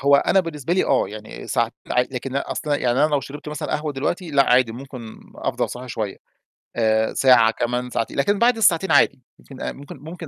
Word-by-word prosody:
هو 140 Hz, +1 st, +5 dB
أنا 190 Hz, +6 st, +3 dB
بالنسبة 165 Hz, -2 st, -4 dB
لي، 185 Hz, -, +2 dB
آه 135 Hz, -, +2 dB
يعني 110 Hz, 0 st, -9 dB
س -, -, -3 dB
ع -, -, +3 dB, 0.2 s
لكن 125 Hz, +1 st, -1 dB
أصلًا 145 Hz, +1 st, -2 dB
يعني، 125 Hz, 0 st, 0 dB
أنا -, -, +3 dB
لو 145 Hz, -2 st, +2 dB
شربت 145 Hz, +3 st, -9 dB
مثلًا 150 Hz, -1 st, -5 dB
قهوة 150 Hz, -1 st, -4 dB
دلوقتي، 160 Hz, +5 st, -3 dB
لأ 140 Hz, -1 st, +5 dB
عادي 125 Hz, -2 st, +4 dB
ممكن 125 Hz, -3 st, -9 dB, 0.2 s
أفضل -, -, -2 dB
صاحي 125 Hz, +1 st, -8 dB
شوية 105 Hz, -3 st, -4 dB, 0.6 s
آآ 110 Hz, -1 st, +1 dB
ساعة 125 Hz, -4 st, +5 dB
كمان 125 Hz, +2 st, -2 dB
ساعتين، 115 Hz, -, -3 dB
لكن 200 Hz, +9 st, +1 dB
بعد 235 Hz, 0 st, +4 dB
الساعتين 190 Hz, -4 st, +3 dB
عادي 140 Hz, -2 st, +4 dB, 0.2 s
ممكن 135 Hz, -, -13 dB
أ -, -, -2 dB
ممكن 145 Hz, +4 st, -11 dB
ممكن 165 Hz, +2 st, -9 dB
135 Hz, 205 wpm, -22 LUFS, 125-150 Hz, 0.6 s, هو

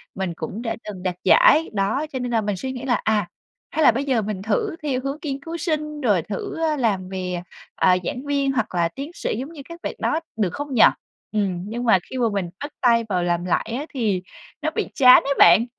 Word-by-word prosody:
mình 190 Hz, -2 st, -2 dB
cũng 215 Hz, +6 st, -5 dB
đã 225 Hz, -, -2 dB
từng 195 Hz, -4 st, -8 dB
đạt 185 Hz, -2 st, -1 dB
giải. 310 Hz, -, +6 dB
Đó, 205 Hz, +9 st, 0 dB
cho 260 Hz, -, -2 dB
nên 245 Hz, -1 st, -3 dB
là 225 Hz, -, +2 dB
mình 205 Hz, -2 st, -2 dB
suy 260 Hz, +8 st, -4 dB
nghĩ 255 Hz, -1 st, -7 dB
là, 250 Hz, -2 st, +1 dB
à, 210 Hz, -4 st, +1 dB, 0.4 s
hay 315 Hz, -, +1 dB
là 280 Hz, -, +8 dB
bây 255 Hz, +5 st, -2 dB
giờ 255 Hz, -5 st, +2 dB
mình 205 Hz, -2 st, -4 dB
thử 375 Hz, -, -1 dB
theo 270 Hz, -4 st, 0 dB
hướng 275 Hz, +2 st, -3 dB
nghiên 275 Hz, -2 st, -3 dB
cứu 335 Hz, +1 st, -5 dB
sinh, 300 Hz, -2 st, -2 dB
rồi 205 Hz, -, +3 dB
thử, 195 Hz, +4 st, -5 dB
a, 310 Hz, -2 st, +1 dB
làm 200 Hz, -7 st, 0 dB
về, 185 Hz, -1 st, -4 dB
à, 175 Hz, -, -5 dB, 0.5 s
à, 180 Hz, -, +4 dB
giảng 250 Hz, +10 st, -4 dB
viên, 280 Hz, -1 st, +1 dB
hoặc 225 Hz, -7 st, -2 dB
là 170 Hz, -1 st, +2 dB
tiến 280 Hz, -, -7 dB
sĩ 220 Hz, -, -3 dB
giống 275 Hz, +6 st, -6 dB
như 290 Hz, -, -9 dB
các 335 Hz, 0 st, -9 dB
bạn -, -, -3 dB
đó, 315 Hz, -, +1 dB, 0.2 s
được 195 Hz, -5 st, 0 dB
không 290 Hz, -1 st, -5 dB
nhỉ? 225 Hz, -, +6 dB, 0.5 s
Ừm, 195 Hz, -5 st, -1 dB
nhưng 240 Hz, +2 st, -4 dB
mà 225 Hz, -6 st, +5 dB
khi 260 Hz, -, -5 dB
mà 235 Hz, -2 st, +2 dB
mình 190 Hz, -4 st, -2 dB
bắt 290 Hz, -, -5 dB
tay 235 Hz, -2 st, +4 dB
vào 180 Hz, -3 st, 0 dB
làm 175 Hz, 0 st, 0 dB
lại 185 Hz, +5 st, -1 dB
á 295 Hz, -, -4 dB
thì 210 Hz, -8 st, 0 dB, 0.4 s
nó -, -, 0 dB
bị -, -, -1 dB
chán 250 Hz, -2 st, +8 dB
ấy 280 Hz, -, 0 dB
bạn, 175 Hz, +7 st, +7 dB
230 Hz, 245 wpm, -22 LUFS, 190-280 Hz, 0.5 s, là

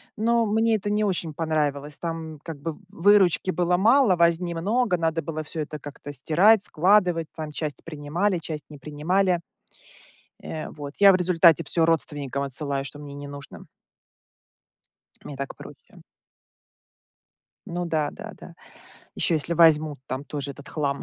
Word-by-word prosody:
но 230 Hz, +1 st, +2 dB
мне 225 Hz, +2 st, +2 dB
это 205 Hz, 0 st, -2 dB
не 210 Hz, 0 st, +1 dB
очень 175 Hz, -5 st, -2 dB
понравилось. 150 Hz, -2 st, -1 dB
Там 165 Hz, -2 st, -5 dB
как 165 Hz, -3 st, -7 dB
бы 165 Hz, 0 st, -3 dB
в -, -, -17 dB
выручки 195 Hz, -2 st, +3 dB
было 180 Hz, 0 st, +1 dB
мало, 230 Hz, 0 st, +5 dB
возни 170 Hz, 0 st, +2 dB
много, 200 Hz, +3 st, +1 dB
надо 165 Hz, 0 st, 0 dB
было 155 Hz, 0 st, -4 dB
всё 155 Hz, +1 st, -5 dB
это 150 Hz, 0 st, -6 dB
как-то 145 Hz, +1 st, -9 dB
стирать, 185 Hz, -, +4 dB
складывать. 180 Hz, -2 st, +2 dB
Там 155 Hz, -2 st, -6 dB
часть 150 Hz, -1 st, -5 dB
принимали, 165 Hz, +5 st, -1 dB
часть 155 Hz, -2 st, -6 dB
не 150 Hz, -, -11 dB
принимали. 175 Hz, +5 st, 0 dB, 1.0 s
Э, 155 Hz, -1 st, -5 dB
вот, 145 Hz, -1 st, -8 dB
я 200 Hz, -1 st, +8 dB
в 185 Hz, -, +4 dB
результате 170 Hz, -3 st, +4 dB
всё 165 Hz, +2 st, +1 dB
родственникам 145 Hz, -4 st, -1 dB
отсылаю, 140 Hz, 0 st, -2 dB
что 145 Hz, +2 st, -8 dB
мне 145 Hz, -1 st, -9 dB
не 145 Hz, 0 st, -8 dB
нужно. 140 Hz, -1 st, -10 dB, 1.6 s
Мне 140 Hz, -, -8 dB
так 140 Hz, 0 st, -5 dB
проще. -, -, -14 dB, 1.7 s
Ну 175 Hz, +1 st, -3 dB
да, 155 Hz, -3 st, -1 dB
да, -, -, -9 dB
да. -, -, -12 dB, 0.6 s
Ещё -, -, 0 dB
если 160 Hz, +2 st, -1 dB
возьмут, 155 Hz, -3 st, +4 dB
там 130 Hz, +2 st, -4 dB
тоже 145 Hz, -1 st, -5 dB
этот 140 Hz, +1 st, -13 dB
хлам 140 Hz, -3 st, -2 dB
165 Hz, 155 wpm, -25 LUFS, 145-180 Hz, 1.7 s, я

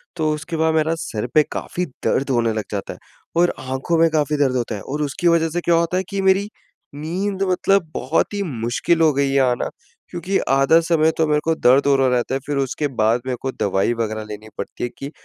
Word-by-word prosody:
तो 160 Hz, -2 st, 0 dB
उसके 150 Hz, +2 st, -5 dB
बाद 160 Hz, 0 st, +2 dB
मेरा 160 Hz, +1 st, +2 dB
सिर 110 Hz, +2 st, -3 dB
पे 155 Hz, -, +6 dB
काफ़ी 180 Hz, -, -3 dB, 0.2 s
दर्द 135 Hz, -, 0 dB
होने 115 Hz, -3 st, +1 dB
लग 110 Hz, -1 st, -2 dB
जाता 100 Hz, -2 st, -4 dB
है -, -, -16 dB, 0.4 s
और 175 Hz, -, +3 dB
आँखों 130 Hz, +5 st, -2 dB
में 165 Hz, 0 st, +5 dB
काफ़ी 150 Hz, -1 st, +1 dB
दर्द 135 Hz, -3 st, +2 dB
होता 120 Hz, -3 st, -2 dB
है, 100 Hz, -, -7 dB
और 145 Hz, +3 st, -4 dB
उसकी 150 Hz, +4 st, -1 dB
वजह 165 Hz, -1 st, +3 dB
से 175 Hz, +2 st, -2 dB
क्या 170 Hz, -, +2 dB
होता 170 Hz, +2 st, +1 dB
है 185 Hz, -, 0 dB
कि 200 Hz, 0 st, -2 dB
मेरी 190 Hz, +1 st, +3 dB, 0.5 s
नींद 190 Hz, +6 st, -2 dB
मतलब 185 Hz, -1 st, +2 dB
बहुत 135 Hz, +10 st, 0 dB
ही 205 Hz, -, -2 dB
मुश्किल 125 Hz, +4 st, 0 dB
हो 160 Hz, -2 st, +5 dB
गई 140 Hz, 0 st, +1 dB
है 140 Hz, -, +3 dB
आना, 125 Hz, -2 st, +1 dB, 0.4 s
क्योंकि 180 Hz, +3 st, -1 dB
आधा 135 Hz, +4 st, +5 dB
समय 160 Hz, -1 st, +2 dB
तो 160 Hz, -, +2 dB
मेरे 150 Hz, 0 st, +2 dB
को 165 Hz, -, +2 dB
दर्द 130 Hz, +1 st, +4 dB
हो 140 Hz, -, +5 dB
रहा 135 Hz, -1 st, +3 dB
रहता 125 Hz, 0 st, 0 dB
है। -, -, -1 dB
फिर 145 Hz, -1 st, -2 dB
उसके 140 Hz, +2 st, -1 dB
बाद 115 Hz, -2 st, +1 dB
मेरे 130 Hz, -1 st, -2 dB
को 135 Hz, -, -2 dB
दवाई 100 Hz, +1 st, 0 dB
वगैरह 110 Hz, -1 st, -3 dB
लेनी 105 Hz, +1 st, -8 dB
पड़ती -, -, -6 dB
है 120 Hz, -, -1 dB
कि 140 Hz, +2 st, -6 dB
150 Hz, 230 wpm, -21 LUFS, 125-165 Hz, 0.5 s, पे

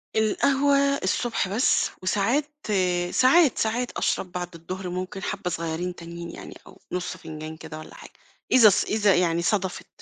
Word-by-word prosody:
القهوة 270 Hz, +6 st, +2 dB, 0.3 s
الصبح 225 Hz, +2 st, 0 dB
بس، 210 Hz, +7 st, +2 dB
وساعات، 235 Hz, +11 st, +1 dB, 0.6 s
ساعات، 270 Hz, +2 st, +5 dB
ساعات 235 Hz, +3 st, -1 dB
أشرب 180 Hz, -, -1 dB
بعد 175 Hz, -1 st, -5 dB
الضهر، 185 Hz, +3 st, -6 dB
ممكن 185 Hz, +2 st, -5 dB
حابّة 200 Hz, -3 st, -3 dB
صغيرين 170 Hz, +2 st, -3 dB
تانيين 170 Hz, 0 st, -8 dB
يعني، -, -, -10 dB
أو -, -, -16 dB
نُص 180 Hz, 0 st, -3 dB
فنجان 155 Hz, 0 st, -8 dB
كده 160 Hz, -1 st, -9 dB
والّا -, -, -11 dB
حاجة، -, -, -12 dB, 0.4 s
إذا 240 Hz, -4 st, +8 dB
ص 200 Hz, -, +2 dB
إذا 210 Hz, -2 st, +2 dB
يعني 170 Hz, -1 st, +2 dB
صدفت، 190 Hz, 0 st, -1 dB
185 Hz, 150 wpm, -25 LUFS, 170-220 Hz, 0.6 s, إذا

